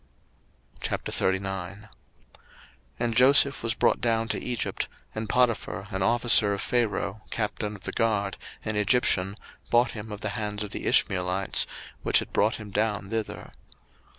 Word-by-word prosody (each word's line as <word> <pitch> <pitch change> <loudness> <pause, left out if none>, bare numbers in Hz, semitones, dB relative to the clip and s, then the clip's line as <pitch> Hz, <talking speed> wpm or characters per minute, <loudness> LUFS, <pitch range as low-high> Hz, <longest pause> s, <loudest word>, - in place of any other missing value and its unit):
01:039:001 95 +1 -2 1.1
And 115 -1 -1
Joseph 140 +3 +6
was 115 -1 0
brought - - +2
down 115 -1 +1
to - - -1
Egypt; 125 -2 -2 0.3
and 110 0 -4
Potiphar, 115 -4 0
an 95 -1 -3
officer 110 -1 +4
of 100 - -5
Pharaoh, 110 -3 -1
captain 105 -1 -3
of 95 - -14
the - - -3
guard, 105 -4 0 0.3
an 110 - -2
Egyptian, 100 -3 +2 0.3
bought 120 +1 +3
him 105 0 -8
of 105 -1 -7
the 110 - -2
hands 105 0 -3
of 105 - -7
the - - -4
Ishmeelites, 90 0 +2 0.3
which - - +4
had - - -2
brought 105 +2 +2
him 105 -2 -9
down 105 -1 -1
thither. 110 -2 -4
105 Hz, 145 wpm, -27 LUFS, 100-115 Hz, 1.1 s, Joseph